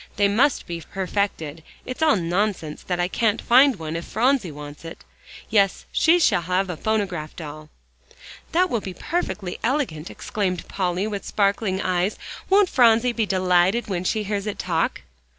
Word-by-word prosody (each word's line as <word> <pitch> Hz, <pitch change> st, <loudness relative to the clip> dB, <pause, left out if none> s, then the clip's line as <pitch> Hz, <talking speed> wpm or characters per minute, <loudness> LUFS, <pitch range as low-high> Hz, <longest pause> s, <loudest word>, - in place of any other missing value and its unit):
"They 205 Hz, 0 st, +3 dB
must 245 Hz, +8 st, +2 dB
be 170 Hz, -1 st, -5 dB
perfected 185 Hz, -5 st, -3 dB, 0.2 s
it's 255 Hz, +4 st, -6 dB
all 315 Hz, -2 st, +5 dB
nonsense 175 Hz, -3 st, -1 dB
that 180 Hz, -1 st, -3 dB
I 175 Hz, -, +2 dB
can't 220 Hz, +3 st, +1 dB
find 260 Hz, +2 st, +5 dB
one 160 Hz, -3 st, -5 dB
if 165 Hz, -, -3 dB
Phronsie 245 Hz, -2 st, +1 dB
wants 145 Hz, +1 st, -10 dB
it! 165 Hz, 0 st, -10 dB, 0.4 s
Yes, 200 Hz, -3 st, +2 dB
she 330 Hz, +2 st, +4 dB
shall 325 Hz, -, +3 dB
have 185 Hz, +2 st, 0 dB
a -, -, -4 dB
phonograph 190 Hz, -6 st, -2 dB
doll." 155 Hz, -1 st, -9 dB, 0.8 s
"That 360 Hz, +3 st, +3 dB
will 230 Hz, -, 0 dB
be 185 Hz, -2 st, -7 dB
perfectly 215 Hz, -, -3 dB
elegant," 230 Hz, -, -1 dB
exclaimed 185 Hz, -5 st, -3 dB
Polly, 185 Hz, 0 st, -1 dB
with 205 Hz, -2 st, -4 dB
sparkling 200 Hz, -1 st, 0 dB
eyes. 185 Hz, +2 st, 0 dB, 0.3 s
"Won't 395 Hz, 0 st, +5 dB
Phronsie 235 Hz, 0 st, +4 dB
be 225 Hz, -2 st, 0 dB
delighted 185 Hz, +4 st, +2 dB
when 180 Hz, -2 st, -2 dB
she 215 Hz, +3 st, 0 dB
hears 205 Hz, 0 st, -3 dB
it 210 Hz, -, -3 dB
talk?" 165 Hz, -3 st, -1 dB
195 Hz, 165 wpm, -23 LUFS, 175-225 Hz, 0.8 s, all